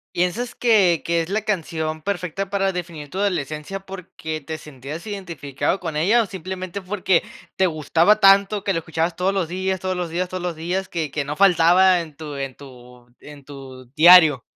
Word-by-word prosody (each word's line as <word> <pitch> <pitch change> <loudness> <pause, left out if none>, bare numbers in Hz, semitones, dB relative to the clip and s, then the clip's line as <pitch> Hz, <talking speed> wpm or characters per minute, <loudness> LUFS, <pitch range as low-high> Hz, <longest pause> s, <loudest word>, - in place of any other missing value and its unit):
¿Piensas 180 +8 -1
que 200 -8 +3
que 170 0 +1
es 165 - -8
la 215 +2 0
canción 160 -6 -3
perfecta 195 +1 -3
para 195 -1 +1
definir 170 -5 -7
tu 180 - -10
adolescencia 175 -2 -2
porque 175 -5 -7
te 160 +2 -6
sentías 150 - -9
identificado 170 -5 -3
con 165 -4 -5
ella 205 +10 +3
o 220 - -4
simplemente 185 +1 -6
porque 185 -2 +1 0.3
te 190 - +3
gustaba 170 +5 +2
tanto 195 +1 +5
que 195 - -1
lo 165 - -1
escuchabas 165 +1 -2
todos 185 +2 0
los 190 -5 -1
días, 190 +1 -2
todos 185 0 -2
los 175 -2 -3
días, 180 +2 -2
todos 185 -1 -5
los 175 -2 -3
días, 180 +4 -3
que 160 -4 -3
que 145 +1 -3
no 145 +1 -4
faltaba 180 0 +4
en 155 -3 -12
tu 150 0 -8
en 135 -2 -5
tu 125 -2 -15
en 145 -1 -13
tu 135 -2 -11
diario? 160 -5 +7
175 Hz, 190 wpm, -21 LUFS, 155-190 Hz, 0.3 s, diario